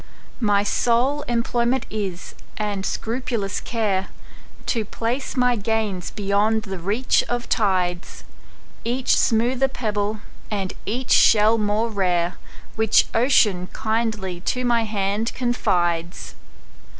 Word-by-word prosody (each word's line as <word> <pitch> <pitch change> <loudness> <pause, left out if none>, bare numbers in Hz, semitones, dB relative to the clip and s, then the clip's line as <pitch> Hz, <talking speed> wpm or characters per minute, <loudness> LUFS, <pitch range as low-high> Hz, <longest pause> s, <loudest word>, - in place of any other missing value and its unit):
My 205 -3 +2
sole 245 +7 +1
employment 240 +1 0
is, 195 -4 -4 0.2
and 205 -2 -2
scrupulous 225 -4 -2
care, 205 -5 -1 0.6
To 230 -3 0
place 235 +6 -3
my 250 -1 +3
gains 210 -3 -2
beyond 210 +2 +1
the 190 -3 -6
reach 210 +9 +1
of 240 0 -2
tides,—Each 195 +5 -2
smoother 245 +3 +2
pebble, 210 -4 -2 0.3
and 195 -3 -3
each 245 +5 -3
shell 220 +1 +5
more 215 +2 0
rare, 180 -3 0 0.4
Which 220 -1 +3
Ocean 215 -7 +3
kindly 220 -5 -2
to 250 +7 -2
my 235 -2 +2
hand 210 +1 -1
confides. 175 -9 -1
215 Hz, 105 wpm, -22 LUFS, 195-235 Hz, 0.6 s, shell